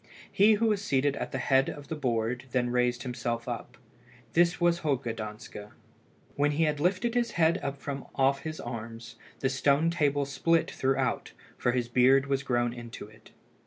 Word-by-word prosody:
He 210 +3 +5
who 215 +2 +1
was 210 -3 +1
seated 140 -4 +1
at - - -4
the - - -2
head 135 +1 +2
of 145 -1 -8
the 160 - -4
board 120 -3 -1
then 125 -1 +1
raised 125 -1 +1
himself 120 -2 -3
up. 120 +1 -6 0.6
This 170 0 +3
was 175 0 +3
Holger 135 -7 -1
Danske. 105 -1 -8 0.7
When 145 +1 +2
he 160 +3 +2
had 150 -2 0
lifted 185 +8 +1
his 240 -2 0
head 165 -1 +3
up 140 0 -4
from 140 -1 -5
off 135 0 +3
his 155 0 -6
arms, 115 -1 -7 0.2
the 135 - +2
stone 140 +5 +2
table 145 -4 +1
split 165 +4 +1
throughout, 130 -2 -1 0.2
for 120 - 0
his 125 -2 0
beard 130 +3 +4
was 140 -1 0
grown 120 -3 0
into 120 -2 -8
it. 110 0 -18
135 Hz, 180 wpm, -29 LUFS, 120-155 Hz, 0.7 s, He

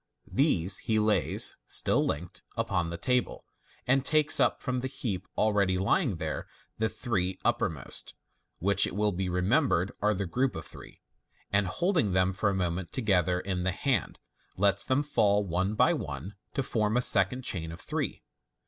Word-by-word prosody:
These 100 - +3
he 110 - +3
lays, 105 -4 +2
still - - +2
linked, 85 +4 -4 0.2
upon 85 -2 0
the 85 - -5
table, 125 +5 -1 0.4
and 135 +1 +2
takes 155 0 +3
up 125 -3 +2
from 130 0 -2
the 130 - -2
heap 100 -8 -4
already 100 -3 +2
lying 105 - +1
there 80 -2 -4 0.3
the 110 0 +1
three 95 -8 -2
uppermost 95 - -2 0.4
(which, 100 +2 +3
it - - -7
will 105 0 +2
be 95 0 -2
remem 95 - +2
bered, 90 +4 +1
are 105 +1 +2
the 100 +1 -2
group 125 +9 0
of 80 -2 -6
three), 75 - -12 0.5
aid 100 0 +3
holding 160 - 0
them 95 +1 +2
for 100 +2 0
a 100 - -1
moment 90 -1 -2
together 95 -7 +1
in 95 -2 -3
the 95 - 0
hand, 110 - -1 0.4
lets 100 0 +2
them 130 +3 +1
fall 105 -8 +2
one 95 +4 -1
by - - +4
one 100 +4 -5 0.2
to 135 - 0
form 110 -3 0
a - - +3
second 105 +5 +4
chain 80 -7 -2
of 85 - -9
three. - - -3
100 Hz, 175 wpm, -29 LUFS, 90-120 Hz, 0.5 s, by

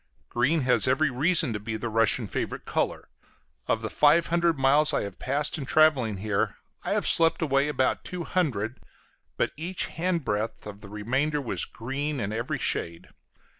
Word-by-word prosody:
Green 140 +7 +1
has 125 -2 +4
every 135 +3 +2
reason 155 0 +2
to 105 - -3
be 110 +1 -4
the 120 - -4
Russian 115 -1 +2
favorite - - -4
color. - - -2 0.6
Of 110 - 0
the 110 - -2
five 150 +3 +4
hundred 170 -1 +1
miles 140 +3 +3
I - - 0
have 100 -2 -8
passed 145 +4 -1
in 135 - -6
traveling 135 -10 +3
here, 100 +1 -1 0.3
I - - -2
have - - 0
slept 165 -1 +3
away 140 -3 +2
about 130 -3 0
two 180 -1 -5
hundred, 130 - -1 0.6
but - - +1
each 175 +4 -2
hand 170 -2 -2
breadth 105 +2 -2
of 105 -1 -9
the 100 - -11
remainder 130 +9 -1
was 130 -5 -2
green 140 +5 -4
in 105 -1 -3
every 115 +3 -2
shade. 85 0 -3
135 Hz, 175 wpm, -27 LUFS, 110-155 Hz, 0.6 s, has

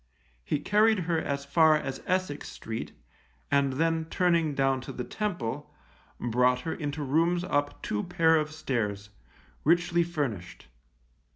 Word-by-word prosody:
He 145 - 0
carried 210 +6 +3
her 165 -1 0
as 140 -2 -3
far 155 +2 +5
as 135 -3 -5
Essex 185 -6 -1
Street, 110 0 -6 0.6
and 140 -1 +3
then 165 +3 +1
turning 165 -3 +1
down 135 -1 +1
to - - -7
the 125 - -5
Temple, 180 - -4 0.5
brought 125 +1 +2
her 160 - -3
into 145 -1 -4
rooms 165 +5 +2
up 145 -5 -1
two 105 - -1
pair 160 -1 +3
of 155 0 -1
stairs, 105 -9 -3 0.5
richly 170 +2 +3
furnished. 135 - -4
150 Hz, 135 wpm, -28 LUFS, 130-170 Hz, 0.6 s, far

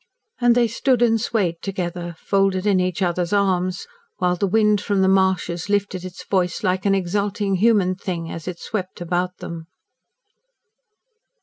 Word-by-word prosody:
And 240 -1 +4
they 240 -1 +4
stood 245 +2 +1
and 225 -2 +3
swayed 190 -8 -1
together, 175 -3 -4
folded 195 0 +1
in 200 -3 +3
each 180 +1 -1
other's 175 -1 -1
arms, 185 -2 +1 0.3
while 180 -1 +1
the 200 +3 0
wind 210 0 +3
from 200 -2 0
the - - +4
marshes 190 -2 +1
lifted 200 -3 0
its 185 -1 -9
voice 185 +1 0
like 185 0 0
an 195 - +4
exulting 200 +2 -1
human 200 -3 +3
thing 175 -3 -5
as 165 0 -7
it 180 -2 -5
swept 190 -4 -5
about 180 +1 -2
them. 165 -1 -8
190 Hz, 160 wpm, -22 LUFS, 180-205 Hz, 0.3 s, And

